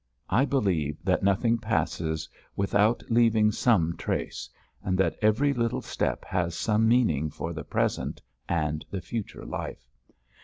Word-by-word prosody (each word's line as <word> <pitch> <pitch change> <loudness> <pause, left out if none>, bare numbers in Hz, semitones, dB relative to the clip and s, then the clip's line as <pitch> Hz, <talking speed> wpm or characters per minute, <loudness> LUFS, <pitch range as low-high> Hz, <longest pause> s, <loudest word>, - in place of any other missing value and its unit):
I 135 - +4
believe 90 - 0
that 95 0 +2
nothing 115 +4 +2
passes 80 -6 -1 0.3
without 105 +3 +2
leaving 115 -2 +4
some 85 -8 +2
trace, - - -3 0.3
and 95 -1 0
that 95 - +2
every 115 +7 +3
little 115 -3 -1
step - - -2
has 85 -2 -1
some 110 +4 +2
meaning 95 - +3
for 80 +3 -5
the 80 -2 -5
present - - -1 0.3
and 75 -2 0
the 95 - -3
future 115 0 -5
life. - - -6
100 Hz, 140 wpm, -27 LUFS, 85-115 Hz, 0.3 s, I